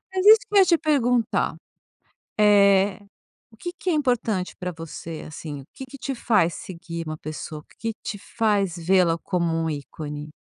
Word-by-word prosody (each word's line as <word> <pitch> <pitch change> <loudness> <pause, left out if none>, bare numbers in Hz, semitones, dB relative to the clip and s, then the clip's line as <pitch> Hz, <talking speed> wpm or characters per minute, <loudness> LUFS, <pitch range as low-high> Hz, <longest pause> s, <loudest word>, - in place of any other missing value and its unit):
Mas 375 +1 0
isso 440 +1 +10
que 420 - -5
eu - - +7
ia 385 - +7
te 340 -1 +4
perguntar. 250 -7 +1 0.8
eh. 200 -2 +5 0.5
O 220 - -19
que 350 +10 -5
que 370 - -5
é - - +2
importante 245 - 0
pra 180 0 -4
você, 165 0 -7
assim? 150 -2 -7
O - - -18
que 265 - -8
que 265 +2 -11
te 270 - -3
faz 210 -9 +2
seguir 170 -5 -7
uma 155 0 -4
pessoa? 155 0 -7
O - - -21
que 225 0 -2
que - - -71
te 205 - -5
faz 200 -4 0
vê-la 175 -1 +3
como 170 -1 -1
um 165 0 0
ícone? 150 0 -6
195 Hz, 190 wpm, -24 LUFS, 165-235 Hz, 0.8 s, isso